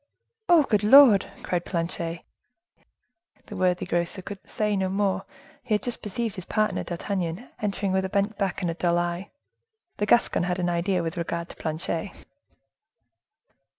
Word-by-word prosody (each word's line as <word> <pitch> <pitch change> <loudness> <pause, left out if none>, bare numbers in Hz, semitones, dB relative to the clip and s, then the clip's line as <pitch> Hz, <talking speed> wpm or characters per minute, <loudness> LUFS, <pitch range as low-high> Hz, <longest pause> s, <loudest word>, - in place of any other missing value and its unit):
"Oh! 340 -3 +7
good 210 -6 +1
Lord!" 230 -3 +7
cried 175 -1 -1
Planchet. 170 -1 -3 1.2
The 210 - -9
worthy 180 -1 +1
grocer 175 +2 -1
could 200 +1 -7
say 210 -1 0
no 190 -1 0
more; 195 0 0 0.4
he 240 -4 0
had 210 - -2
just 245 -2 -3
perceived 215 +1 -3
his 185 - -5
partner. 215 0 0
D'Artagnan 180 +3 -4
entered 200 -1 -1
with 190 0 +1
a - - -3
bent 200 +2 0
back 195 -2 -2
and 170 - +1
a - - -3
dull 170 0 +1
eye: 175 +2 -2 0.7
the 205 - -1
Gascon 235 -7 +3
had 180 0 -1
an 175 -1 0
idea 175 +1 0
with 165 +2 -4
regard 170 0 -3
to - - -10
Planchet. 165 +4 -3
190 Hz, 160 wpm, -26 LUFS, 175-210 Hz, 1.2 s, Oh